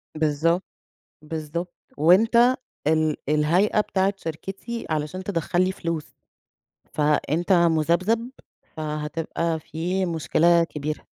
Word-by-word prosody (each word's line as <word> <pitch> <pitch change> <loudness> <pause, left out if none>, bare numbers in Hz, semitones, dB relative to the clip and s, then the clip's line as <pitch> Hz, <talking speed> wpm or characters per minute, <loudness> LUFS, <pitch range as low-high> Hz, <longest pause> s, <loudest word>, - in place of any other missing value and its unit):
بالضبط، 160 +3 +1 0.6
بالضبط 160 +3 -5 0.2
وأنت 225 - +5 0.3
ال 155 -1 +2
الهيئة 170 +8 +3
بتاعة 195 -1 0
شركتي، 195 +7 -6
علشان 155 +4 -3
تدخّل 180 -1 0
لي 185 - 0
فلوس، 165 -4 -4 0.8
فأنت 150 +4 +1
مُذبذب، 175 +7 +2 0.5
فهتبقى 155 +2 -3
في 180 +5 -2
مشكلة 170 +1 +3
كبيرة. 150 -1 -5
165 Hz, 90 wpm, -24 LUFS, 155-185 Hz, 0.8 s, وأنت